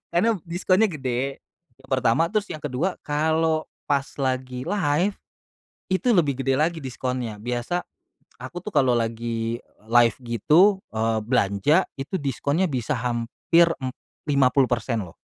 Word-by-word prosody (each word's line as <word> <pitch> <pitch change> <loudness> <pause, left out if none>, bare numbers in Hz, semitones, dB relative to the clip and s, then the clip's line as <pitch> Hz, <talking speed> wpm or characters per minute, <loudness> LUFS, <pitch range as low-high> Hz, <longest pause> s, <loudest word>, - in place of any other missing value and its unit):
Karena 180 +7 +3 0.2
diskonnya 185 +4 +2
gede 135 -4 -3 0.4
yang 135 - -19
pertama, 130 +5 +2
terus 210 0 0
yang 155 - -7
kedua 150 +7 -2
kalo 160 +1 +1 0.2
pas 140 -1 +2 0.2
lagi 130 -1 -2
live 185 0 +1 0.8
itu 190 +7 +1
lebih 150 - +3
gede 135 0 +1
lagi 160 +2 0
diskonnya. 125 -4 -4
Biasa, 120 +10 -3 0.6
aku 175 +8 -7
tuh 210 - -6
kalau 125 -6 +3
lagi 115 0 -2 0.2
live 120 +1 +4
gitu, 165 - +4
eee, 110 0 +1
belanja 115 - +2 0.2
itu 140 +8 -3
diskonnya 145 +3 0
bisa 135 -3 -1
hampir, 120 +8 +2
mmm, 130 -1 -4 0.3
50% 130 -5 +2
loh. 85 - -13
135 Hz, 130 wpm, -24 LUFS, 120-165 Hz, 0.8 s, live